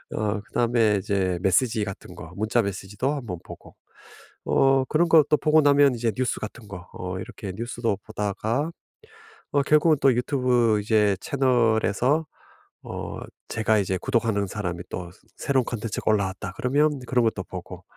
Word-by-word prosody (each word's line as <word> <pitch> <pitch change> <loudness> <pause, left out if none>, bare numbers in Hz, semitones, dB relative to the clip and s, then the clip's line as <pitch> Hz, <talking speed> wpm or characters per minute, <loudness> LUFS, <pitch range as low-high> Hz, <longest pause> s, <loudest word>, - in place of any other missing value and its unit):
어 105 -1 -1
그다음에 115 0 +1
이제 95 -2 0
메시지 110 +4 +2
같은 100 -2 -8
거 80 - -10
문자 110 +3 +1
메시지도 100 +6 -3
한 140 -4 -5
번 90 -5 -5
보고 - - -12 0.7
어 135 0 +3
그런 165 +5 +2
것도 155 -2 +5
보고 155 0 +4
나면 145 -2 +5
이제 115 -1 0
뉴스 130 -2 -1
같은 110 +1 -8
거 90 -3 -9
어 90 0 -5
이렇게 95 0 -7
뉴스도 115 -1 -2
보다가 110 - -2 0.8
어 145 - +3
결국은 150 +2 +4
또 135 - +6
YouTube 125 -3 +2
이제 105 -2 +2
채널에서 125 +2 +2 0.6
어 - - -6 0.3
제가 110 -1 +1
이제 95 -1 -1
구독하는 115 -5 0
사람이 90 -4 -4
또 90 -1 -6 0.3
'새로운 130 -3 +1
컨텐츠가 115 -2 -3
올라왔다.' 95 -3 -1
그러면 145 +3 +1
그런 125 -2 +2
것도 105 -4 -1
보고 - - -9
115 Hz, 335 characters per minute, -25 LUFS, 100-130 Hz, 0.8 s, 또